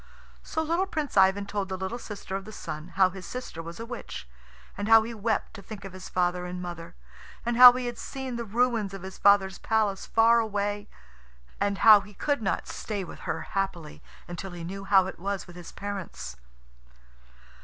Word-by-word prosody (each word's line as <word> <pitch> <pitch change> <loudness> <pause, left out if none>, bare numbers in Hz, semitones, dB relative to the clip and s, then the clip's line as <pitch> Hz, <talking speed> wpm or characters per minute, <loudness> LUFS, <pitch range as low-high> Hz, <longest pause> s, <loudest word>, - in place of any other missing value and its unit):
So 320 - -2
little 335 +4 0
Prince 310 -7 -3
Ivan 195 +1 +4
told 200 -1 -3
the 190 - -3
little 190 +6 -4
sister 205 -4 -6
of 195 - -3
the 215 - -10
Sun 160 -4 -7
how 185 -1 +5
his 190 0 -9
sister 250 -5 -6
was 170 +3 -9
a 230 - -5
witch, 235 - -7 0.5
and 205 +1 -3
how 225 0 +8
he 230 +1 -5
wept 220 -1 -1
to 210 - -9
think 200 0 -9
of 195 - -8
his 185 0 -9
father 180 0 0
and 180 0 -5
mother, 175 -2 -7 0.5
and 240 0 0
how 250 +1 +12
he 250 0 -3
had 240 -1 -4
seen 265 -2 -5
the 235 - -3
ruins 225 -2 0
of 190 - -9
his 190 0 -8
father's 195 -2 +4
palace 215 -3 0
far 230 +1 +5
away, 205 -1 -2 0.7
and 200 0 0
how 215 -2 +10
he 205 0 -14
could 285 +2 0
not 195 - -1
stay 205 -3 -4
with 175 - -10
her - - -1
happily 180 -6 -4 0.3
until 175 +2 -6
he 175 -1 -7
knew 195 +3 -6
how 195 -1 +5
it 190 - -7
was 200 +1 -3
with 175 - -13
his 175 -1 -10
parents. 195 - -6
200 Hz, 200 wpm, -27 LUFS, 185-225 Hz, 0.7 s, how